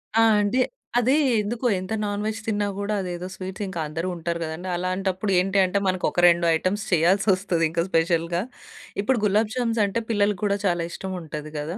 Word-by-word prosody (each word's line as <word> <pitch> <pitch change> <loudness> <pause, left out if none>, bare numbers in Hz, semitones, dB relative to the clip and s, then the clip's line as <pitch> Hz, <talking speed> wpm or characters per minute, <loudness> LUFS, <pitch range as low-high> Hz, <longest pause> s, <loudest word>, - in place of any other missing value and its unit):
ఆ! 225 - +5 0.2
అంటే 205 +6 +1 0.4
అది 255 +3 +3 0.3
ఎందుకో 235 +4 -2
ఎంత 185 +4 -5
నాన్ 205 0 -2
వెజ్ 220 +1 -2
తిన్నా 205 -2 0
గూడా 200 +1 -2
అదేదో 180 0 -5
స్వీట్స్ 190 +2 -6
ఇంకందరూ 165 -2 -3
ఉంటారు 170 0 -3
కదండీ. 160 +4 -5
అలాంటప్పుడు 185 +2 -1
ఏంటి 195 +2 0
అంటే 185 +2 0
మనకొక 185 -1 0
2 170 0 +2
ఐటెమ్స్ 190 +5 -1
చేయాల్సొస్తది 185 0 +2
ఇంకా 165 +1 0
స్పెషల్‌గా. 170 0 +1 0.6
ఇప్పుడు 240 +2 +1
గులాబ్ 210 +2 +2
జామ్స్ 230 -3 0
అంటే 215 +4 -1
పిల్లలకి 205 -3 +1
కూడా 200 -1 +1
చాలా 175 -2 +1
ఇష్టం 190 -1 -5
ఉంటాది 155 -1 -7
గదా! 160 +5 -4
185 Hz, 170 wpm, -24 LUFS, 170-205 Hz, 0.6 s, ఆ